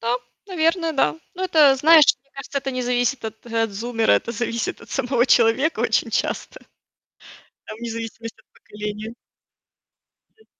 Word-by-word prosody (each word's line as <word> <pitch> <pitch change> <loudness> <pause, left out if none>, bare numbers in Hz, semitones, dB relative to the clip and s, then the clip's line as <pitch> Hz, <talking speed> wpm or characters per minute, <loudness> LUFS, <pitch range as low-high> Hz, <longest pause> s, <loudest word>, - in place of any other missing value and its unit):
Да, 235 +2 0 0.3
наверное, 330 -2 0
да. 160 - +1 0.2
Ну 370 - -6
это, 300 -6 +5
знаешь, 315 +3 +7 0.2
мне 275 - -38
кажется, 275 +1 -4
это 270 - -4
не 255 -1 -3
зависит 245 +1 0
от 220 0 -7
от 225 -1 -1
зумера, 225 +2 0
это 235 - 0
зависит 230 0 -3
от - - -15
самого 245 0 0
человека 245 +4 +3
очень 230 0 +1
часто. - - -3 1.1
Там 215 - -9
вне 235 0 -5
зависимости 230 0 -7
от - - -33
поколения. 210 +2 -7 1.2
М. 440 - -25
240 Hz, 155 wpm, -22 LUFS, 225-275 Hz, 1.2 s, знаешь